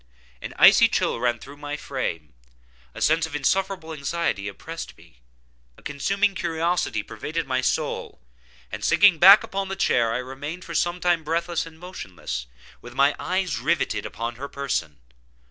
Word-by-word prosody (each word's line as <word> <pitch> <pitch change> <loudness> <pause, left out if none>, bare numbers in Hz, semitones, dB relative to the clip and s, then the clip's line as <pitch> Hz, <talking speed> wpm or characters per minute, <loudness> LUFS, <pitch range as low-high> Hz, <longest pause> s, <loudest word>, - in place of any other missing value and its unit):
An - - -7
icy - - +8
chill - - 0
ran 120 0 +1
through 140 +5 -12
my 145 0 -5
frame; 85 - -4 0.6
a - - -3
sense 160 +1 +3
of 155 - -8
insufferable 185 +2 -1
anxiety 145 -8 -2
oppressed 100 - -8
me; - - -21 0.6
a - - -19
consuming 195 +8 0
curiosity 165 - -1
pervaded 150 +11 -4
my 130 -1 0
soul; 130 - -2 0.5
and - - -6
sinking 195 -6 +5
back 195 +5 +9
upon 195 0 -3
the 195 - -4
chair, 120 -11 +2
I 115 - 0
remained 140 +7 -6
for 170 - -7
some 175 +2 0
time 175 -2 +1
breathless 170 +2 -1
and 160 -1 -13
motionless, 90 - -7 0.3
with - - -11
my 140 +1 +4
eyes 185 -7 -1
riveted 160 +7 0
upon 115 0 -5
her 140 +3 -5
person. 110 - -3
150 Hz, 160 wpm, -24 LUFS, 125-175 Hz, 0.6 s, back